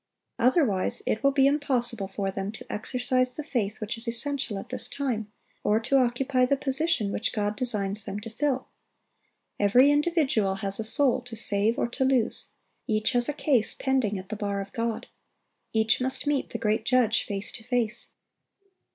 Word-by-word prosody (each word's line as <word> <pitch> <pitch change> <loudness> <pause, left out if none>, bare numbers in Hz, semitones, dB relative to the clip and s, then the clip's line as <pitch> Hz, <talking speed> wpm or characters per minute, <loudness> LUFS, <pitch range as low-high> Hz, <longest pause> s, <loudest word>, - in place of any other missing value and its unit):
Otherwise, 250 - +2
it 215 - -1
will 275 - +5
be 270 -1 +3
impossible 250 -7 +3
for 195 0 -3
them 195 +1 -4
to 220 - -11
exercise 250 +2 0
the 305 - -5
faith 220 -8 -2
which 220 +2 -4
is 230 - -3
essential 240 -1 0
at 195 - -8
this 250 -1 -4
time, 230 -7 -3 0.3
or 210 +1 +2
to 235 +4 -1
occupy 255 +1 +1
the 275 +2 +2
position 275 -5 0
which 220 - -2
God 205 -1 -2
designs 210 -4 0
them 200 +1 -5
to 225 +1 -9
fill. 265 +2 -1 0.9
Every 245 +8 +5
individual 290 - +1
has 195 0 -2
a - - -1
soul 260 +3 +4
to 245 -2 -9
save 215 +1 +1
or - - 0
to 265 +3 -2
lose. 260 -4 +2 0.4
Each 215 -2 0
has 245 0 +1
a - - -1
case 265 -6 +1
pending 260 -7 0
at 185 0 -9
the 215 - -4
bar 200 -1 -3
of 195 0 -7
God. 230 -1 -3 0.7
Each 220 +2 +2
must 260 +3 +2
meet 290 -2 0
the - - -4
great 215 0 0
Judge 240 -2 +2
face 200 +1 -3
to 225 - -10
face. 235 -2 -2
235 Hz, 180 wpm, -26 LUFS, 210-265 Hz, 0.9 s, will